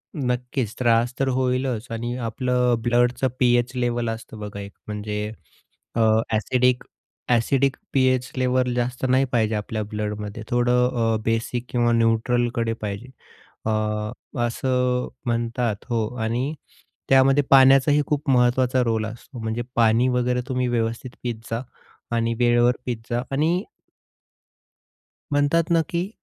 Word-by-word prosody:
नक्कीच, 125 Hz, -3 st, -2 dB
त्रास 120 Hz, 0 st, +2 dB
तर 135 Hz, -, +1 dB
होईलच. 130 Hz, -2 st, 0 dB
आणि 120 Hz, +2 st, -3 dB
आपलं 125 Hz, +1 st, +1 dB
ब्लडचं 120 Hz, +2 st, +2 dB
पी-एच 120 Hz, 0 st, +3 dB
लेव्हल 120 Hz, -1 st, 0 dB
असतं 115 Hz, -1 st, -7 dB
बघा, 105 Hz, -1 st, -6 dB
एक 100 Hz, 0 st, -7 dB, 0.2 s
म्हणजे 105 Hz, 0 st, -4 dB, 0.6 s
अ, -, -, 0 dB, 0.3 s
ॲसिडिक, 125 Hz, +3 st, +2 dB, 0.5 s
ॲसिडिक 130 Hz, +3 st, +2 dB, 0.2 s
पी-एच 130 Hz, -1 st, +2 dB
लेव्हल 125 Hz, -1 st, +1 dB
जास्त 125 Hz, +1 st, -2 dB
नाही 130 Hz, +1 st, +4 dB
पाहिजे 110 Hz, -2 st, +2 dB
आपल्या 105 Hz, +1 st, -3 dB
ब्लडमध्ये. 105 Hz, +1 st, -5 dB
थोडं 125 Hz, 0 st, +3 dB, 0.3 s
अ, -, -, +1 dB
बेसिक 115 Hz, +2 st, -1 dB
किंवा 120 Hz, -1 st, +2 dB
न्यूट्रलकडे 115 Hz, 0 st, +1 dB
पाहिजे. 105 Hz, +4 st, -5 dB, 0.6 s
अ, 110 Hz, -, +1 dB, 0.7 s
असं 125 Hz, +1 st, 0 dB, 0.2 s
म्हणतात, 115 Hz, -1 st, 0 dB
हो. 115 Hz, -2 st, 0 dB, 0.2 s
आणि 125 Hz, +7 st, -1 dB, 0.6 s
त्यामध्ये 135 Hz, +2 st, +5 dB
पाण्याचाही 135 Hz, +2 st, +6 dB
खूप 150 Hz, 0 st, -1 dB
महत्त्वाचा 125 Hz, 0 st, +3 dB
रोल 110 Hz, -2 st, 0 dB
असतो, 120 Hz, +3 st, -9 dB
म्हणजे 110 Hz, +1 st, -2 dB
पाणी 115 Hz, +2 st, +4 dB
वगैरे 125 Hz, 0 st, +1 dB
तुम्ही 125 Hz, -1 st, 0 dB
व्यवस्थित 115 Hz, +1 st, -2 dB
पीत 120 Hz, -2 st, -2 dB, 0.2 s
जा 115 Hz, +2 st, -1 dB, 0.5 s
आणि 115 Hz, 0 st, +1 dB
वेळेवर 120 Hz, 0 st, +4 dB
पीत 120 Hz, -3 st, -2 dB
जा 120 Hz, +1 st, 0 dB
आणि, 165 Hz, +7 st, +1 dB, 1.7 s
म्हणतात 145 Hz, +4 st, +2 dB
ना 165 Hz, -1 st, +4 dB
की 175 Hz, +3 st, -2 dB
120 Hz, 125 wpm, -23 LUFS, 115-130 Hz, 1.7 s, पाण्याचाही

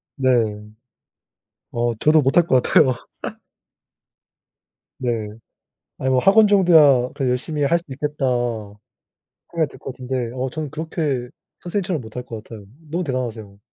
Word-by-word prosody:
네. 130 Hz, -2 st, +1 dB, 1.4 s
어 120 Hz, 0 st, 0 dB
저도 155 Hz, +6 st, +4 dB
못 135 Hz, 0 st, +1 dB
할 170 Hz, -1 st, +5 dB
것 130 Hz, -1 st, +4 dB
같아요. 130 Hz, -5 st, +4 dB, 2.0 s
네. 115 Hz, -4 st, -2 dB, 0.7 s
아니 130 Hz, -, -1 dB
뭐 130 Hz, -, +3 dB
학원 210 Hz, -, +6 dB
정도야 160 Hz, -11 st, +5 dB
그래도 135 Hz, -3 st, -1 dB
'열심히 145 Hz, +4 st, -2 dB
할 170 Hz, +5 st, +3 dB
수 170 Hz, -, -14 dB
있겠다.' 145 Hz, +1 st, -3 dB, 1.3 s
생각이 160 Hz, -5 st, 0 dB
들 -, -, -14 dB
것 -, -, -6 dB
같은데. 125 Hz, -2 st, -4 dB
어 130 Hz, +1 st, -2 dB
저는 155 Hz, +1 st, -5 dB
그렇게 155 Hz, -6 st, -3 dB, 0.3 s
선생님처럼 175 Hz, -3 st, -2 dB
못 110 Hz, -2 st, -12 dB
할 125 Hz, 0 st, -5 dB
것 115 Hz, -3 st, -8 dB
같아요. 110 Hz, -3 st, -11 dB, 0.2 s
너무 175 Hz, +4 st, -2 dB
대단하세요. 115 Hz, -, -4 dB
135 Hz, 270 characters per minute, -21 LUFS, 125-160 Hz, 2.0 s, 학원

